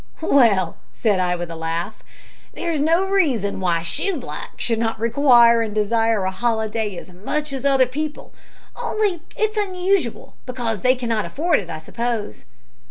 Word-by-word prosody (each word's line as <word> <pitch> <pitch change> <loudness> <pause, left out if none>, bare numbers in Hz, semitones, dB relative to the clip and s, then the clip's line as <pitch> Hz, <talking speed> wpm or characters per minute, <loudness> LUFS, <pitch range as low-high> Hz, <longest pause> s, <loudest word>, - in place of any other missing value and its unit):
"Well," 215 - +3
said 205 -5 +1
I, 180 -1 +1
with 175 -1 -5
a - - -6
laugh, 165 +5 -4 0.5
"there 340 - -2
is 305 -3 -1
no 335 +5 +3
reason 275 - +1
why 175 -3 +1
shoeblacks 275 - -4
should 230 -2 +1
not 225 -1 -1
require 235 -1 +5
and 215 -2 -3
desire 225 0 +2
a 190 - 0
holiday 220 -1 -1
as 180 - -10
much 285 +11 -3
as 270 +1 -1
other 270 -2 +4
people, 295 +4 -5 0.5
only 405 -6 0 0.2
it's 435 0 0
unusual 370 - -1
because 235 -5 -3
they 255 +1 +4
cannot 230 -4 -1
afford 330 +2 +1
it, 180 -5 -8
I - - -4
suppose." 225 - -4
235 Hz, 160 wpm, -21 LUFS, 205-295 Hz, 0.5 s, require